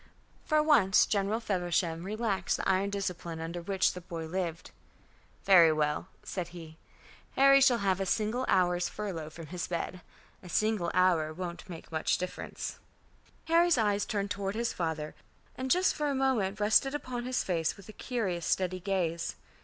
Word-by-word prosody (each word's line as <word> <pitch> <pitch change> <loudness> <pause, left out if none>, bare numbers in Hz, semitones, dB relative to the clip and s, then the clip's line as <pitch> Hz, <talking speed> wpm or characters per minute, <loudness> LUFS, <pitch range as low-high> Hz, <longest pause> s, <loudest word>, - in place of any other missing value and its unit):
For 305 0 +3
once 235 -11 +5
General 205 +2 0
Feversham 175 -5 -1
relaxed 205 -3 -1
the - - -3
iron 195 +1 +2
discipline 180 -4 -4
under 165 +2 -5
which 190 +2 +1
the 180 - -8
boy 165 -2 -6
lived. 170 -1 -4 0.7
"Very 175 -5 +7
well," 150 +2 0 0.2
said 180 -3 -4
he. 165 -2 -11 0.6
"Harry 275 0 +6
shall 255 -3 +5
have 195 -3 0
an 215 +6 0
hour's 180 -1 +2
furlough 180 -7 -5
from 165 +1 -10
his 175 +3 -5
bed. 180 +1 -4 0.4
A 180 - -12
single 215 -3 +1
hour 175 -4 +3
won't 175 +3 -7
make 165 -2 -9
much 160 -1 +1
difference." 180 0 -6 0.7
Harry's 335 -1 +4
eyes 205 -2 +2
turned 205 -3 -2
toward 200 0 -2
his 235 +1 -1
father, 160 -3 -3 0.4
and 260 0 -4
just 365 +6 +3
for 300 - -2
a 280 - 0
moment 235 -7 0
rested 220 +7 +3
upon 250 -4 -4
his 255 0 0
face 165 -1 -1
with 200 - -14
a 215 - -10
curious 195 -9 -3
steady 185 -1 0
gaze. 175 -3 -1
190 Hz, 160 wpm, -30 LUFS, 170-220 Hz, 0.7 s, Very